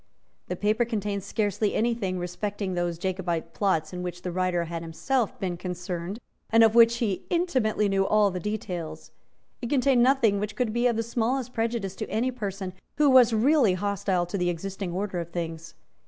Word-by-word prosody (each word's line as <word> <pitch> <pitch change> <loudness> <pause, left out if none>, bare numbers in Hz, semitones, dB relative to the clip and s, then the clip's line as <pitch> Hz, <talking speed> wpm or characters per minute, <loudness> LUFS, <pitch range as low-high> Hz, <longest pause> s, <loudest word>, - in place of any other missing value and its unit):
The 180 - -3
paper 215 +5 +1
contained 210 -3 -2
scarcely 205 -1 -1
any 235 +2 +2
thing 190 -5 -2
respecting 190 +2 -3
those 175 -1 -1
Jacobite 175 -3 -2
plots 185 -5 0
in 180 - -4
which 175 -1 -6
the 180 - -3
writer 180 -1 0
had 170 0 -5
been - - -9
himself 230 +9 -1
concerned, 180 0 -4 0.3
and 225 0 +6
of 220 -1 +5
which 235 0 +6
he 210 -6 -2
intimately 255 - +1
knew 195 -1 +1
all 210 -2 +4
the 180 - -4
details. 175 -6 -5 0.5
It 240 - -4
contained 265 -2 +3
nothing 240 -6 +4
which 210 0 -4
could 225 -2 -1
be 240 +1 +2
of 240 - +1
the 225 - 0
smallest 245 +2 -1
prejudice 225 -4 -2
to - - -4
any 245 +4 0
person 195 -6 -5 0.2
who 295 -1 +5
was 250 -3 +7
really 230 -2 +4
hostile 195 -2 0
to 185 +3 -4
the 180 0 +1
existing 190 +2 -4
order 185 0 -2
of 170 -1 -5
things. 165 -1 -5
200 Hz, 185 wpm, -26 LUFS, 180-230 Hz, 0.5 s, was